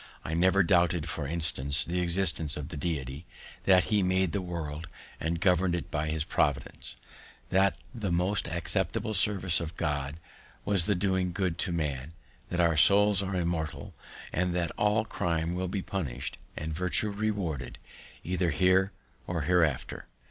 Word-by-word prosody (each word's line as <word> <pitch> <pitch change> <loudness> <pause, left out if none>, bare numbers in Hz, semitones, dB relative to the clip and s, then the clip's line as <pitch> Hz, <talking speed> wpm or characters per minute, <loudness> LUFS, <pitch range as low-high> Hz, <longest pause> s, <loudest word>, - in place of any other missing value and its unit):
I 80 - -3
never 95 +4 +4
doubted, 85 -2 +2
for 75 -1 -3
instance, 80 -3 0
the 90 +2 -1
existence 85 -3 +1
of 75 -2 -5
the - - -5
Deity; 70 -2 -3 0.4
that 95 -1 +6
he 105 -2 +2
made 95 -1 +2
the 100 - -1
world, 80 -3 -5 0.3
and 85 +1 -1
govern'd 90 0 +3
it 85 - -5
by 75 0 -1
his 80 -1 0
Providence; 70 -4 -1 0.5
that 95 0 +3 0.2
the 105 -6 -3
most 90 +4 +1
acceptable 90 +6 -1
service 95 -5 +3
of 85 -1 -6
God 75 -2 -2 0.5
was 100 -3 +2
the 105 - +3
doing 95 -1 0
good 90 -2 -1
to 90 - 0
man; 75 -3 -2 0.4
that 90 - -2
our 85 -2 +4
souls 100 +4 +5
are 95 -1 -3
immortal; 85 -3 -2 0.4
and 90 0 0
that 85 -3 0
all 105 +1 +1
crime 85 -5 -1
will 90 +1 -2
be 95 +1 -3
punished, 85 -11 -4 0.2
and 80 +1 -3
virtue 90 +5 +1
rewarded, 100 - -2 0.5
either 90 0 0
here 95 +4 +3 0.4
or 85 -2 -1
hereafter. 80 -4 +1
85 Hz, 155 wpm, -29 LUFS, 80-95 Hz, 0.5 s, that